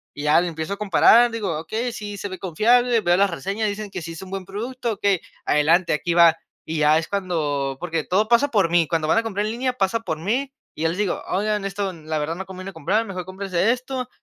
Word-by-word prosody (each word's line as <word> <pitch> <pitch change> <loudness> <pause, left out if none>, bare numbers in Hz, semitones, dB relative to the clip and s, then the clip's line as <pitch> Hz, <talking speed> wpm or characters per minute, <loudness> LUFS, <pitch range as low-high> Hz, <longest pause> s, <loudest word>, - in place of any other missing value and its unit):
y 145 - -6
ya 150 +3 +4
le 180 - -1
empiezo 160 +3 -4
a - - -6
comparar, 215 +4 +5
digo: 200 -9 -3
"Okey, 220 +10 -3
sí, 205 -2 -6
se 200 - -4
ve 185 -2 -8
confiable, 230 +7 +3
veo 175 -3 +3
las 200 +1 +3
reseñas, 195 +7 -2
dicen 205 0 -5
que 185 -2 -5
sí 165 0 -7
es 165 - -9
un 190 - -11
buen 195 -1 -5
producto, 235 +4 -4
okey, 200 -4 +1 0.2
adelante, 165 +4 +3
aquí 170 +3 -1
va". 170 -2 +7 0.3
Y 160 0 -3
ya 155 +1 +5
es 160 - -2
cuando 150 -8 -2
porque 165 -3 -2
todo 205 +4 +1
pasa 240 +5 +4
por 195 -8 +2
mí. 170 -3 +3
Cuando 160 -2 0
van 225 - +4
a 230 - -2
comprar 205 -2 -2
en 215 - -2
línea, 250 +2 -1
pasa 225 0 0
por 160 -8 -4
mí, 240 - -1 0.2
y - - -9
yo 165 - +3
les 170 - -4
digo: 205 -4 -1
"Oigan, 210 +1 0
esto, 195 -1 -3
la 155 -1 -4
verdad 155 +2 -2
no 190 0 -7
conviene 190 +1 -8
comprar, 210 +9 0
mejor 185 -4 -6
cómprense 190 +2 0
esto 255 0 -4
190 Hz, 245 wpm, -22 LUFS, 165-215 Hz, 0.3 s, va